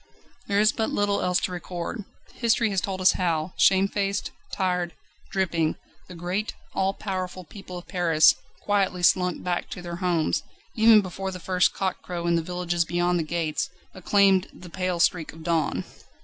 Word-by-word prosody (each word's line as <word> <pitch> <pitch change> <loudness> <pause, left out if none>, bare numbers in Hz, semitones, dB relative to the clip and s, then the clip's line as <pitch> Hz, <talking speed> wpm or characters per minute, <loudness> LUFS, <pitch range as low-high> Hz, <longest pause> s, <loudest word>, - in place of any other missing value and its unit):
There 200 -1 +2
is 215 0 +5
but 220 - -1
little 205 0 0
else 180 0 +2
to - - -2
record. 180 +3 -5 0.3
History 230 -2 +1
has 195 -2 +1
told 190 -1 -3
us 185 - +6
how, 170 -1 -1
shamefaced, 195 +1 +2 0.2
tired, 180 -2 -1 0.3
dripping, 170 -4 0 0.3
the 180 - -10
great, 180 +5 -3 0.2
all 195 +1 0
powerful 185 -2 -4
people 185 +1 -10
of 175 - -10
Paris 165 -4 +5 0.3
quietly 195 -3 0
slunk 180 0 +3
back 175 -1 -2
to 180 - -7
their 170 -1 -5
homes, 175 -3 +1 0.3
even 220 -1 +6
before 190 0 -5
the 185 -1 -6
first 180 +1 +2
cock 190 -2 -2
crow 175 -1 -5
in 170 - +2
the 165 - +2
villages 175 0 -1
beyond 175 +1 0
the - - 0
gates, 155 -1 -2 0.2
acclaimed 190 0 +3
the 180 -2 -13
pale 185 -1 -2
streak 170 -2 +1
of 160 0 -12
dawn. 165 -2 0
180 Hz, 170 wpm, -25 LUFS, 175-195 Hz, 0.3 s, us